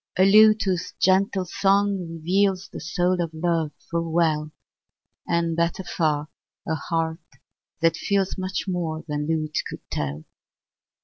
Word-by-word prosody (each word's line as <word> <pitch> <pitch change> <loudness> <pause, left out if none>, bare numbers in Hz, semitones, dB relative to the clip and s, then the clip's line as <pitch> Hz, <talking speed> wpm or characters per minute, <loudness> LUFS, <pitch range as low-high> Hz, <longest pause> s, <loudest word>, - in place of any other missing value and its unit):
A 185 - +6
lute 215 +2 +7
whose 185 -3 -2
gentle 190 0 +2
song 200 +2 +2
reveals 185 +3 0
The - - -6
soul 180 +2 0
of 165 -2 -2
love 165 -2 0 0.2
full 165 -1 -1
well; 155 -2 +1 0.8
And, 170 -1 +1
better 170 +3 0
far, 155 -4 -1 0.4
a 160 - 0
heart 160 +1 -2 0.6
that 165 0 +3
feels 195 -2 0
Much 185 0 -3
more 165 -4 -2
than 150 -1 -2
lute 155 -1 -1
could - - -10
tell. 75 +1 -3
170 Hz, 135 wpm, -24 LUFS, 160-190 Hz, 0.8 s, lute